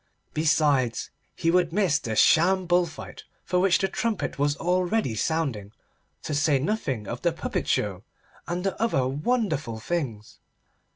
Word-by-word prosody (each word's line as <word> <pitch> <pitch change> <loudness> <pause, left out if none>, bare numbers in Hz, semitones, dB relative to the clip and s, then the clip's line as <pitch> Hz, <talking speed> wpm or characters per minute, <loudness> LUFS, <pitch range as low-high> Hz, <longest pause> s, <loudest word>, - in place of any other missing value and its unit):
Besides, 145 -6 +1 0.2
he 165 - +1
would 175 -2 +2
miss 175 -5 +2
the 110 -8 -4
sham 185 - +4
bull 175 0 +3
fight 160 - -10 0.2
for 180 - +1
which 185 0 +4
the 195 - 0
trumpet 230 - -2
was 145 0 +1
already 180 - 0
sounding, 115 -6 -2 0.5
to 155 - -3
say 145 0 +3
nothing 135 - -2
of - - -5
the - - +2
puppet - - -3
show 100 -2 -1 0.4
and 175 +1 -3
the 195 - -1
other 140 - +1
wonderful 150 - -1
things. 115 -7 -4
160 Hz, 150 wpm, -26 LUFS, 130-180 Hz, 0.5 s, sham